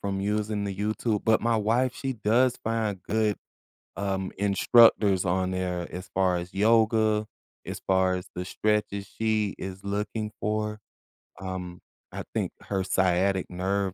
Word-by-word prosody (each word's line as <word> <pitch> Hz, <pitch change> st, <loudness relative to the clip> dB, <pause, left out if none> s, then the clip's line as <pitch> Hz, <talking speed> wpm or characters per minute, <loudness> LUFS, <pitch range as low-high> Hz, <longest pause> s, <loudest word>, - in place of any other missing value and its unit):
from 100 Hz, -1 st, -2 dB
using 105 Hz, 0 st, -1 dB
the 100 Hz, -1 st, -3 dB
YouTube, 105 Hz, +1 st, -1 dB
but 110 Hz, -1 st, +4 dB
my 115 Hz, 0 st, +2 dB
wife, 120 Hz, +4 st, +1 dB
she 135 Hz, +2 st, -3 dB
does 120 Hz, +3 st, +2 dB
find 110 Hz, -4 st, -1 dB
good, 110 Hz, -1 st, 0 dB, 0.6 s
um, 95 Hz, -1 st, -2 dB
instructors 100 Hz, -1 st, +5 dB
on 95 Hz, +1 st, 0 dB
there 90 Hz, -2 st, -2 dB
as 90 Hz, +1 st, -7 dB
far 95 Hz, -1 st, +2 dB
as 85 Hz, +1 st, -7 dB
yoga, 110 Hz, 0 st, +3 dB, 0.4 s
as -, -, -5 dB
far 95 Hz, -1 st, +3 dB
as 90 Hz, +1 st, -5 dB
the 90 Hz, -, -4 dB
stretches 105 Hz, 0 st, -1 dB
she 110 Hz, -1 st, -1 dB
is 95 Hz, 0 st, -7 dB
looking 105 Hz, +2 st, -3 dB
for, 105 Hz, 0 st, -2 dB, 0.6 s
um, 90 Hz, -2 st, -5 dB, 0.3 s
I -, -, -5 dB
think -, -, -1 dB
her 95 Hz, -2 st, -2 dB
sciatic 95 Hz, 0 st, +1 dB
nerve 95 Hz, +1 st, -1 dB
100 Hz, 145 wpm, -27 LUFS, 95-110 Hz, 0.6 s, instructors